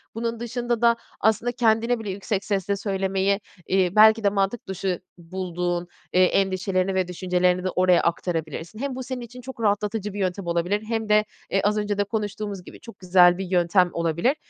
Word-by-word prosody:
Bunun 230 0 -3
dışında 240 0 -2
da 235 -1 +5 0.2
aslında 220 +3 +2
kendine 230 0 +2
bile 210 -3 -6
yüksek 200 +1 -3
sesle 200 -1 0
söylemeyi, 195 0 0 0.3
eee, 185 -2 +2
belki 220 +1 +7
de 200 - +4
mantık 200 +3 -1
dışı 190 -1 -2 0.2
bulduğun, 175 0 -3 0.3
eee, 185 0 +5
endişelerini 190 0 0
ve 185 -1 +1
düşüncelerini 180 0 0
de 185 - 0
oraya 180 -1 +3
aktarabilirsin. 165 +2 -3
Hem 275 -1 -3
bu 260 - -5
senin 255 -1 -5
için 245 +2 -10
çok 255 -2 -9
rahatlatıcı 210 0 0
bir 205 - -5
yöntem 185 -1 -2
olabilir 175 +5 0
hem 225 -2 -2
de, 210 0 +4 0.3
eee, 195 - +2
az 210 +1 +2
önce 205 -1 -1
de 205 - +2
konuştuğumuz 205 -2 -4
gibi, - - -12
çok 230 - -13
güzel 180 -1 +5
bir 195 - -3
yöntem 180 0 +3
olabilir. 170 - +1
195 Hz, 180 wpm, -24 LUFS, 180-220 Hz, 0.3 s, belki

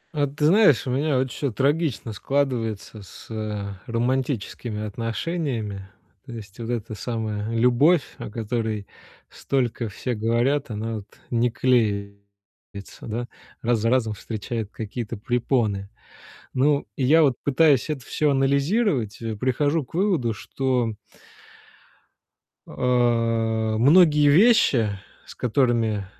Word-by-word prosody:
А 145 -1 +2
ты 145 +2 -2
знаешь, 170 - +5
у 125 - -2
меня 140 +1 +1
вот 130 0 0
всё 140 +1 -2
трагично 140 -2 0
складывается 115 -4 -2
с, 95 - -13
э, 105 -2 -4 0.2
романтическими 120 -3 -2
отношениями. 115 - -3 0.4
То 120 - -8
есть, 105 -2 -10
вот 115 0 -5
эта 115 -2 -3
самая 110 -2 -3
любовь, 125 +8 +4 0.2
о - - -6
которой 110 -1 -3 0.4
столько 120 -4 -2
все 125 +4 -4
говорят, 120 +5 0
она, 110 +1 -3
вот, 100 -1 -9 0.2
не 120 0 +2
клеится, 100 -5 -3
да, 120 +2 -3 0.4
раз 120 -1 +2
за 115 +2 +1
разом 115 -3 +1
встречает 110 +1 -5
какие-то 115 +1 -5
препоны. 115 -3 0 0.6
Ну 140 +2 +2
и 130 - -1
я 160 +5 +5
вот 140 -4 +4
пытаюсь 145 -1 +3
это 145 -5 -4
всё 150 +1 0
анализировать, 140 - +1
э, 110 -1 -3
прихожу 145 +6 0
к 125 - -23
выводу, 170 - +1
что 125 +1 -1 1.7
а, 115 -3 +1
многие 150 +3 +6
вещи, 145 - +5 0.4
с - - -12
которыми 115 -4 +1
120 Hz, 120 wpm, -24 LUFS, 110-140 Hz, 1.7 s, многие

